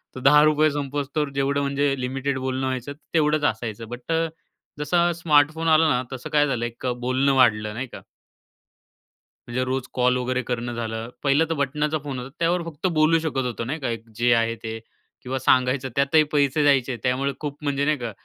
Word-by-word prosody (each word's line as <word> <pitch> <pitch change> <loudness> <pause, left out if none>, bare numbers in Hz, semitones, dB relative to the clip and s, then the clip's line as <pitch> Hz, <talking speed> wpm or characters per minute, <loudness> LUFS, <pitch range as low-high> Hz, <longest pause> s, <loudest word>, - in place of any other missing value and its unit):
तर - - -5
₹10 150 +3 +5
संपेस्तोवर 145 +1 -2
तर 140 - -10
जेवढं, 140 +1 0
म्हणजे 140 0 +1
लिमिटेड 135 +1 -2
बोलणं 130 0 -2
व्हायचं, 130 +2 -3 0.2
तेवढंच 150 -2 +2
असायचं. 110 0 -7
बट 125 +5 -7
अ, 165 0 +1 0.5
जसा 170 +4 +2
स्मार्टफोन 160 -1 +2
आला 160 0 +5
ना, 125 -1 +2
तसं 130 - -7
काय 145 -1 +3
झालं, 120 -4 -1
एक 120 +2 -7 0.2
बोलणं 130 +2 +2
वाढलं, 105 -4 +3
नाही 125 +4 -4
का? - - -11 1.5
म्हणजे 125 +1 -1
रोज 130 0 -1
कॉल 125 0 +2
वगैरे 130 0 -1
करणं 120 0 -3
झालं. 115 0 -4
पहिलं 145 +3 +3
तर 165 - +1
बटणाचा 150 +2 0
फोन 135 -3 -4
होता. 125 +2 -7
त्यावर 170 +1 +1
फक्त 165 +2 -3
बोलू 155 +2 +4
शकत 145 -5 -2
होतो, 120 -1 -3
नाही 145 +7 -4
का? 130 - -2
एक 115 0 -6
जे 120 +1 +3
आहे 115 0 +1
ते 110 0 -5 0.4
किंवा 130 +1 -3
सांगायचं, 130 +1 +2
त्यातही 140 +3 +4
पैसे 145 0 +2
द्यायचे. 135 -3 +2
त्यामुळे 130 +2 0
खूप 145 -1 -5
म्हणजे 140 -1 0
नाही 150 0 +2
का 120 -3 -5
135 Hz, 185 wpm, -24 LUFS, 125-150 Hz, 1.5 s, ₹10